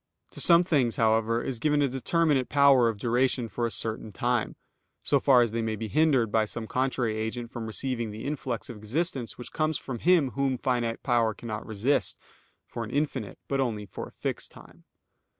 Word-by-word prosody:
To - - -4
some 170 0 +7
things, 140 -10 +1
however, 115 +1 +2
is 125 -4 -4
given 150 +2 +2
a - - +3
determinate 135 +1 +1
power 140 -4 +5
of 110 - -4
duration 120 +2 +1
for 120 +1 -2
a - - -3
certain 110 +1 -4
time, 120 +1 -1 0.5
so 140 - +2
far 130 -3 +5
as 115 - -2
they 115 +1 -1
may 110 -1 -1
be 110 +1 -5
hindered 130 -3 +3
by 110 0 +3
some 110 +1 -6
contrary 125 -2 -1
agent 115 +2 -4
from 120 -4 -5
receiving 120 0 -3
the 105 +1 -7
influx 135 -5 -3
of 120 - -8
existence 125 - -2
which 125 - -9
comes 155 -1 0
from 125 -3 -6
Him 170 -7 +3
Whom 135 -1 0
finite 120 -3 -1
power 115 -4 +2
cannot 110 -2 -6
resist, 110 +6 0 0.5
for 115 - -6
an 110 - -7
infinite, 135 -7 -2
but 135 - -1
only 110 -6 -1
for - - -7
a - - -15
fixed - - -4
time. - - -17
120 Hz, 195 wpm, -27 LUFS, 110-135 Hz, 0.5 s, some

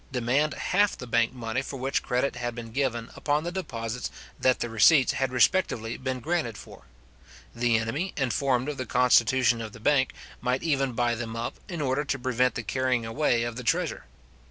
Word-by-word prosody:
demand 130 +5 +1
half 205 +2 +1
the - - -7
bank 115 -1 +2
money 120 0 -3
for 135 0 -6
which 135 +1 -1
credit 125 +3 0
had 120 -1 -4
been 115 -2 -7
given 120 -3 -1
upon 150 +1 0
the 175 - -3
deposits 120 -10 -4 0.3
that 130 -1 +3
the - - -1
receipts 125 +5 +5
had 135 -1 -1
respectively 125 - +2
been 130 -1 -3
granted 150 -6 -1
for. - - -13 0.7
The 115 -1 +2
enemy, 135 +12 -2
informed 130 0 +1
of 150 -2 -3
the 130 - -4
constitution 125 0 +3
of 110 -2 -7
the - - -11
bank, 135 +3 +2 0.3
might 125 +1 0
even 135 -5 +1
buy 120 0 +1
them 115 -1 -5
up, 115 +1 -4
in 170 -4 -4
order 135 +1 0
to 135 - -2
prevent 125 0 +1
the 120 - -3
carrying 125 0 0
away 115 0 +1
of 120 0 -4
the 125 - -5
treasure. 115 - 0
125 Hz, 190 wpm, -27 LUFS, 115-135 Hz, 0.7 s, receipts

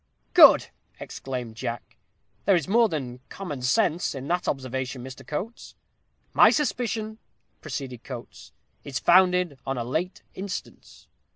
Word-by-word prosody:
'" - - -43
"Good!" - - +9 0.3
exclaimed 125 -4 -6
Jack. 120 -1 -5 0.5
"There 195 - +5
is 165 -5 0
more 230 +3 +4
than 130 -6 -4
'common 150 -9 -6
sense' 170 - +1
in 135 +1 -6
that 175 +1 0
observation, 130 -1 -3
Mr. 130 +1 -9
Coates." 200 - -6 0.6
"'My - - +8
suspicion,'" 225 -5 -1 0.4
proceeded 130 -5 -6
Coates, 125 -3 -9 0.3
"'is 135 -3 -4
founded 180 -3 +4
on 135 -1 -3
a 120 - -1
late 160 +10 -3
instance. 190 0 -8
145 Hz, 130 wpm, -26 LUFS, 130-190 Hz, 0.6 s, Good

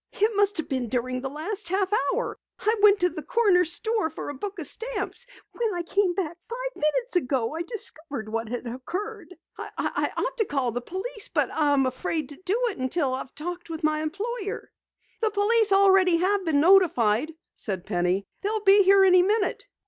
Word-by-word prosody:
"It 425 +2 +1
must 410 0 +2
have 320 - -1
been 255 -4 -2
during 255 +1 -2
the 270 - -4
last 345 +7 -4
half 380 +1 0 0.2
hour. - - -2 0.2
I 435 +2 +1
went 410 -1 +6
to 360 - +4
the 335 - -7
corner 430 -7 +3
store 435 +2 0
for - - -7
a - - -4
book 395 +9 -6
of 335 - -4
stamps. 485 +3 -3 0.2
When 455 -5 -2
I 345 - -2
came 365 0 +1
back 345 -3 -3
five - - -5
minutes 385 +8 0
ago 255 -5 -1
I 325 - -3
discovered 315 - -3
what 225 +1 -3
had 245 +1 -4
occurred. 365 - -6 0.2
I - - -2
ought - - -2
to 440 - +1
call 270 -7 -1
the 245 +2 -3
police, 395 - -4
but - - +1
I 295 -2 +2
am 270 -2 +3
afraid 275 +3 -3
to 290 +4 -9
do 390 +5 0
it 385 - -11
until 260 +1 -1
I've 260 0 -6
talked 350 +2 -6
with 320 -1 -6
my 305 0 +1
employer." 405 +6 -4 0.5
"The 445 - +2
police 425 +1 +2
already 385 -3 +5
have 385 +2 +1
been 310 -3 +2
notified," 310 - +4 0.2
said 190 -4 -5
Penny. 180 0 0 0.2
"They'll 425 +1 -2
be 400 0 +7
here 390 0 +6
any 365 -1 +6
minute." 405 +2 0
360 Hz, 195 wpm, -25 LUFS, 280-410 Hz, 0.5 s, be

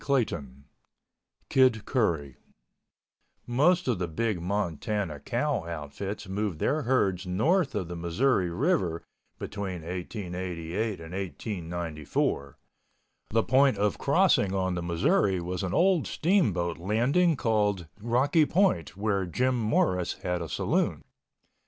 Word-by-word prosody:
CHAPTER 140 -4 +3
XI 70 - -10 1.0
KID 130 -5 +3
CURRY 80 - 0 1.1
Most 150 +9 +2
of 120 -7 +1
the 90 - -1
big 95 +3 -1
Montana 95 -2 -2
cow - - -1
outfits 85 +6 -5
moved 100 -2 -2
their 155 - 0
herds 100 -8 +1
north 140 - +1
of 95 -5 -2
the 85 - -6
Missouri 90 +4 +1
River 90 - 0 0.3
between 95 -5 -5
1888 90 +2 -4
and 80 +1 -9
1894. 85 -7 -3 0.7
The 115 +1 +2
point 130 -2 +4
of 100 -1 0
crossing 100 -1 +3
on 95 -1 0
the 90 - -2
Missouri 85 +3 +2
was 90 +1 -3
an 95 - -2
old 185 -2 +3
steamboat 100 - +1
landing 125 - +2
called 105 -6 +1 0.2
Rocky 135 +7 +3
Point 155 - +1
where 100 -3 0
Jim 125 +3 0
Norris 90 -5 +1
had 90 -1 -1
a 85 - -5
saloon. - - 0
100 Hz, 120 wpm, -28 LUFS, 85-120 Hz, 1.1 s, point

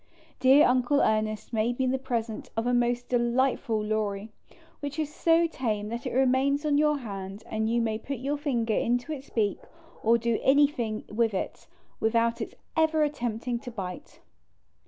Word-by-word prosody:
Dear 265 +3 +6
Uncle 255 +3 +3
Ernest 215 +1 0
made 230 +2 0
me 260 - +1
the 260 +1 0
present 230 -4 -3
of 225 - 0
a 245 - +1
most 245 0 +1
delightful 240 -2 +1
Lory\ 210 -1 -2 0.5
which 285 0 -5
is 305 -1 -2
so 335 0 +3
tame 220 -9 -2
that 235 +4 -4
it - - -3
remains 270 +3 +2
on 290 -1 +3
your 300 -1 +3
hand, 200 -4 -7
and 220 0 -1
you 235 +1 +2
may 220 -1 -1
put 275 +4 -5
your 275 +4 -2
finger 240 -7 0
into 245 +6 0
its 280 -2 -6
beak, 210 -4 0 0.4
or 230 +1 +4
do 235 -1 0
anything 265 -6 +2
with 220 -1 +1
it, - - -4 0.3
without 230 +1 +1
its - - -5 0.2
ever 320 -1 +3
attempting 240 -4 -2
to 245 - -8
bite. 200 - -7
240 Hz, 170 wpm, -27 LUFS, 220-275 Hz, 0.5 s, Dear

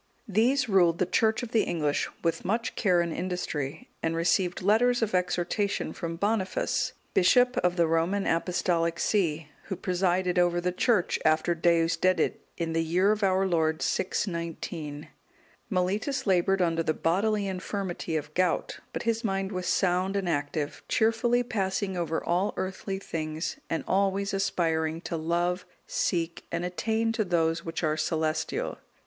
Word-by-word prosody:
These 245 +6 +2
ruled 175 -5 +4
the 185 - +2
Church 220 +6 +1
of 230 - -6
the 225 - +4
English 150 -4 0
with 165 -1 0
much 225 +4 -1
care 180 -5 +3
and 170 -1 -2
industry, 160 -5 -3
and 165 0 0
received 175 +2 +1
letters 235 +4 +3
of 215 - -1
exhortation 180 +3 0
from 165 -1 -4
Boniface,(199) 200 +1 -1
bishop 245 +7 +4
of 180 0 +2
the 170 -2 +3
Roman 165 +5 +1
Apostolic 170 0 0
see, 165 -7 0 0.2
who 190 - -3
presided 180 0 +1
over 175 0 +3
the 180 +1 0
Church 195 +1 +1
after 155 +2 +3
Deusdedit, 170 +1 +2 0.2
in 165 -1 -2
the 165 0 +1
year 180 +5 +3
of 215 0 -1
our 190 -1 +3
Lord 160 -3 +1
619. 170 -5 -3 0.6
Mellitus 205 +8 0
laboured 190 -1 +3
under 165 -1 +1
the 155 -1 0
bodily 205 +5 +1
infirmity 185 -3 -3
of 155 0 -3
gout, 185 +2 0
but - - -3
his 230 0 0
mind 195 -2 -1
was 185 -2 -3
sound 185 +1 +1
and 195 -2 -1
active, 145 -1 -2
cheerfully 230 +2 +2
passing 195 -4 -1
over 165 -2 -2
all 180 +4 0
earthly 190 +1 -3
things, 160 -3 -4
and 165 - -1
always 195 +1 +1
aspiring 165 -5 0
to 170 - -4
love, 175 +3 0 0.2
seek, 170 -2 -1
and 170 +1 -2
attain 220 +6 0
to 225 -1 0
those 170 -3 +1
which 165 +1 -4
are 155 0 +1
celestial. 155 0 -1
180 Hz, 150 wpm, -28 LUFS, 165-195 Hz, 0.6 s, ruled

